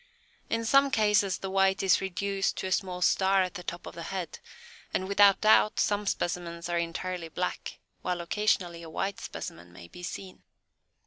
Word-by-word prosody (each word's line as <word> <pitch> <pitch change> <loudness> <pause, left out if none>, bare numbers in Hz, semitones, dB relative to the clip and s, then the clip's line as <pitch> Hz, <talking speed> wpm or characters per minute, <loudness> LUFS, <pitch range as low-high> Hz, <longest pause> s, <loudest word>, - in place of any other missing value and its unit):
In 230 0 -1
some 275 +4 +5
cases 210 -5 +2
the 190 - -5
white 195 0 +2
is 190 - +4
reduced 195 +1 -1
to - - -3
a 185 - -3
small 180 -1 -1
"star" 190 +1 +4
at 180 - -4
the 180 - -6
top 175 0 -6
of - - -8
the 170 - -8
head, 175 -1 -5 0.6
and 185 - -1
without 200 0 +5
doubt 215 0 +5
some 205 0 +1
specimens 170 -2 -2
are 175 0 0
entirely 170 0 -4
black, 180 +3 -4 0.2
while 180 -1 -2
occasionally 175 -2 0
a 165 - -9
white 195 +4 -3
specimen 85 +1 -8
may 85 -1 -12
be 175 - -12
seen. 185 +1 -7
185 Hz, 180 wpm, -29 LUFS, 175-200 Hz, 0.6 s, some